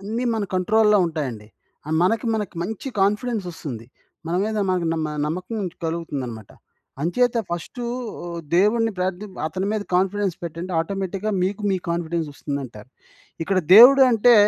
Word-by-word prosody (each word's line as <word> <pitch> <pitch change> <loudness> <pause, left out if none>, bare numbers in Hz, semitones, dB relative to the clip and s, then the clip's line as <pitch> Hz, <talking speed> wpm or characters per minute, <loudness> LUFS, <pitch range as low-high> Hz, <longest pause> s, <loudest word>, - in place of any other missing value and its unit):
అన్ని 225 +5 -3
మన 215 -2 -1
కంట్రోల్‌లో 210 +3 +4
ఉంటాయండి, 130 -10 -4 0.4
ఆహ్, 155 - -1
మనకి 225 +5 +1
మనకి 210 -5 -3
మంచి 220 +7 -5
కాన్ఫిడెన్సొస్తుంది, 195 - -2 0.4
మన 170 - -2
మీద 215 0 -2
మనకు 180 -2 0
నమ్మ 160 -1 -1 0.2
నమ్మకం 185 +8 -4 0.3
కలుగుతుందనమాట. 135 - -4 0.5
అంచేత 245 +9 +2 0.2
ఫస్టు 175 +8 -5 0.4
ఆహ్, 170 -1 -5 0.2
దేవుడిని 225 +3 +3
ప్రార్థిం 190 +2 -2 0.2
అతని 190 +4 -3
మీద 215 -1 -1
కాన్ఫిడెన్స్ 190 -1 +1
పెట్టండి, 170 +3 -5
ఆటోమేటిక్‌గా 195 +3 -3
మీకు 200 +3 -1
మీ 190 - +1
కాన్‌ఫి‌డెన్స్ 170 -1 -2
ఒస్తుందంటారు. 130 -7 -6 0.6
ఇక్కడ 190 +1 +1 0.2
దేవుడు 265 +5 +10
అంటే, 235 +1 +5
185 Hz, 135 wpm, -23 LUFS, 165-215 Hz, 0.6 s, దేవుడు